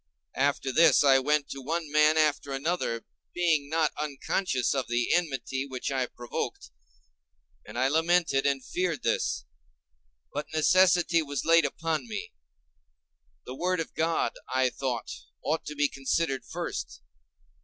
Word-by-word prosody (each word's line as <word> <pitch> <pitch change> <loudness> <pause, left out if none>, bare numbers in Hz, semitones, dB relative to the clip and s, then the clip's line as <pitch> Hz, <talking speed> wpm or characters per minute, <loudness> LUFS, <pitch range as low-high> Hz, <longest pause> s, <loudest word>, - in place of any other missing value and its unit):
After 140 -1 +1
this 160 0 +5
I 135 -2 +6
went 145 +2 +1
to 135 - -6
one 160 +2 -3
man 150 +1 +4
after 150 -2 +1
another, 135 -5 -2 0.3
being 160 -5 +1
not 160 0 +1
unconscious 145 -1 -1
of 135 -2 -2
the 120 0 +1
enmity 135 -6 -1
which 130 -1 -4
I 130 -2 0
provoked, 120 - -5 1.0
and 105 - -8
I 130 +1 +3
lamented 160 -2 +2
and 135 -2 -1
feared 180 -4 -2
this: 75 - 0 0.9
but 145 +1 -3
necessity 175 +1 +4
was 145 -3 -4
laid 165 -1 +5
upon 160 - -2
me—the - - -12
word 180 +5 -1
of 165 - -4
God, 165 +1 0 0.2
I 130 -1 +2
thought, 125 -3 -3 0.3
ought 160 +1 -1
to 150 - -5
be 145 0 +2
considered 135 0 -1
first. - - -5
145 Hz, 135 wpm, -28 LUFS, 130-165 Hz, 1.0 s, I